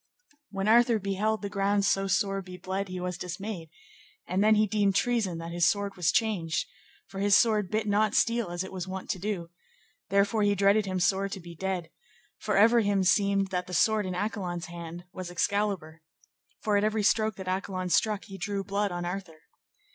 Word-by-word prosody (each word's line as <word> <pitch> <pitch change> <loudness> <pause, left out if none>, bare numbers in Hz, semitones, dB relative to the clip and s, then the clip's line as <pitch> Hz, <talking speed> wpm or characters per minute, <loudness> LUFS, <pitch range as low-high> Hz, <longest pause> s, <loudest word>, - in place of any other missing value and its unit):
When 195 0 -3
Arthur 235 +1 +5
beheld 210 +2 -1
the 200 - -3
ground 200 0 +1
so 195 0 +2
sore 195 0 +1
be 185 -1 -10
bled 190 +2 -3
he 185 0 -5
was 180 0 -4
dismayed, 180 -1 -6 0.6
and 185 +3 +1
then 215 0 +5
he 215 0 +4
deemed 200 -2 +1
treason 220 -8 +1
that 165 0 -6
his 175 0 +3
sword 200 -1 -2
was 175 -4 +2
changed; 195 -9 0 0.4
for 195 - -8
his 200 0 +4
sword 215 -4 +2
bit 215 0 -1
not 210 +1 +2
steel 230 -4 +2
as 175 +1 -3
it 190 - -8
was 185 -1 -5
wont 190 0 -4
to 190 - -4
do, 180 -4 -4 0.6
therefore 200 +2 +2
he 205 0 +3
dreaded 200 +1 +3
him 185 -1 -1
sore 195 +2 +1
to 195 - -6
be 170 -1 -10
dead, 180 -1 -3 0.5
for 210 -2 -1
ever 230 +4 +6
him 200 -3 +2
seemed 195 +1 +2
that 180 -1 -2
the 180 - -4
sword 215 0 +3
in 185 - -3
Accolon's 180 -3 -3
hand 170 +1 -8
was 185 -1 -6
Excalibur, 180 -3 -1 0.6
for 210 -1 +2
at 200 - +1
every 215 0 +1
stroke 215 0 +2
that 190 -1 -8
Accolon 185 -1 -2
struck 210 +2 +1
he 195 -2 -10
drew 200 +1 -2
blood 200 0 -1
on 175 0 -4
Arthur. 175 -3 -6
195 Hz, 200 wpm, -28 LUFS, 180-210 Hz, 0.6 s, ever